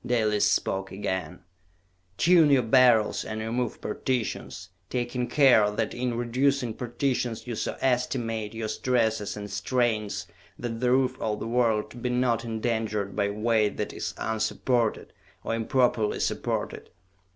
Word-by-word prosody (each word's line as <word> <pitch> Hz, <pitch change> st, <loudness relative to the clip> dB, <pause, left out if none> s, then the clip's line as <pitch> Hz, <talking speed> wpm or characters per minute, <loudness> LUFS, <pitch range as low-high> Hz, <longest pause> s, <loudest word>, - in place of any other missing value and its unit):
Dalis 110 Hz, -4 st, +2 dB
spoke 95 Hz, -1 st, -1 dB
again. 95 Hz, -2 st, -4 dB, 0.8 s
"Tune 170 Hz, -3 st, +5 dB
your 135 Hz, -3 st, +4 dB
Beryls 115 Hz, -2 st, +4 dB
and 110 Hz, 0 st, -5 dB
remove 115 Hz, +2 st, -2 dB
partitions, 120 Hz, +1 st, -3 dB, 0.2 s
taking 125 Hz, 0 st, -2 dB
care 125 Hz, -8 st, +5 dB
that 105 Hz, +1 st, -2 dB
in 120 Hz, -1 st, -2 dB
reducing 125 Hz, +1 st, +1 dB
partitions 120 Hz, -1 st, -2 dB
you 120 Hz, -, -4 dB
so -, -, -3 dB
estimate 115 Hz, -4 st, -1 dB
your 110 Hz, -1 st, -3 dB
stresses 110 Hz, -3 st, 0 dB
and 105 Hz, 0 st, -5 dB
strains 110 Hz, 0 st, -1 dB, 0.3 s
that 115 Hz, -2 st, -4 dB
the 125 Hz, 0 st, +1 dB
roof 130 Hz, 0 st, +2 dB
of 105 Hz, -1 st, -1 dB
the -, -, -4 dB
world 115 Hz, -1 st, 0 dB
be 125 Hz, -, -1 dB
not 125 Hz, -1 st, +1 dB
endangered 110 Hz, -3 st, -2 dB
by 100 Hz, -1 st, +1 dB
weight 105 Hz, 0 st, +1 dB
that -, -, -3 dB
is -, -, -4 dB
unsupported, 110 Hz, +1 st, -1 dB, 0.3 s
or -, -, -2 dB
improperly 115 Hz, -1 st, +1 dB
supported! -, -, -2 dB
115 Hz, 135 wpm, -27 LUFS, 110-125 Hz, 0.8 s, Tune